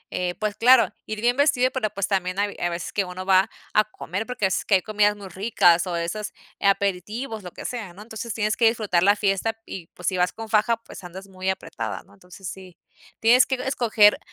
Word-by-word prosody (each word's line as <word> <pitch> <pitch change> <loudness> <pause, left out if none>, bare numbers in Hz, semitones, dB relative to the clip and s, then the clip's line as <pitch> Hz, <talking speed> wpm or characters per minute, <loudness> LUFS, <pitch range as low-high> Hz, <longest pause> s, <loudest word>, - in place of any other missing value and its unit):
eh 180 -1 -1
pues, 215 -1 -2
claro, 245 +2 +5
ir 215 0 -4
bien 245 +2 +2
vestido, 255 -3 +3
pero, 235 -5 -1
pues, 200 -2 -2
también 185 -1 -1
hay 205 0 -1
hay 175 - 0
veces 170 0 -5
que 200 - +1
uno 180 +1 -7
va 190 0 +4 0.2
a 215 - +5
comer 200 -1 -5
porque 250 -5 -2
es 190 - 0
que 200 - +4
hay 185 - +3
comidas 210 0 +2
muy 200 -2 -10
ricas, 185 -2 +3
o, 175 - -2
esas 170 +5 -3 0.3
aperitivos, 200 +4 -1
lo 180 - -8
que - - -10
sea, 220 -8 -5
¿no? 195 - -13
Entonces 220 0 -6
tienes 215 -1 0
que 230 - +5
disfrutar 215 -6 +1
la 200 +3 +5
fiesta, 210 +2 0
y 175 -3 -8
pues 180 - -8
si 185 - +1
vas 180 0 +2
con 225 -1 -8
faja, 225 +2 +3
pues, 230 - -13
andas 185 +2 -9
muy 190 0 -4
apretada, 190 - -4
¿no? - - -23
Entonces 185 0 -12
sí 185 -3 -9 0.4
tienes 240 +3 +6
que 265 - 0
escoger 235 -5 +3
205 Hz, 220 wpm, -24 LUFS, 185-225 Hz, 0.4 s, tienes